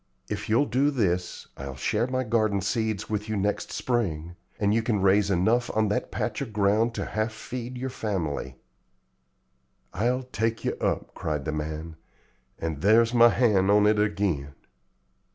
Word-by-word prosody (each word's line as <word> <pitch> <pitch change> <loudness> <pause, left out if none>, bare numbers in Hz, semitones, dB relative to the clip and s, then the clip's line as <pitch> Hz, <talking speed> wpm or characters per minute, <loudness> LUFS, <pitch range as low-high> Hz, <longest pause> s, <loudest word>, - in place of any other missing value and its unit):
If - - -4
you'll 115 +7 +4
do 140 +2 +2
this, 90 -10 -1
I'll 70 -1 -6
share 115 - 0
my 130 0 -1
garden 110 -4 +1
seeds 110 +1 -1
with 105 0 -3
you 110 - -1
next 100 +1 -1
spring, 85 -9 -2 0.2
and 105 0 +2
you 115 - +2
can 110 -2 0
raise 100 +1 +4
enough 110 +6 +2
on 110 -1 +3
that 105 - -1
patch 115 0 -3
of 130 -5 -4
ground 105 +3 +2
to - - -2
half 110 +1 -2
feed 120 +3 -6
your 130 +1 -4
family." 80 - -3 1.4
"I'll 125 +6 0
take 115 -2 -2
yer - - +1
up," - - -1
cried 75 -3 -3
the - - -1
man, 80 +1 -5 0.6
"and 80 -3 -4
there's 115 +4 +4
my 120 -1 +7
hand 105 -6 +3
on 105 0 +5
it 105 0 +3
ag'in." 100 -10 0
105 Hz, 165 wpm, -26 LUFS, 95-115 Hz, 1.4 s, my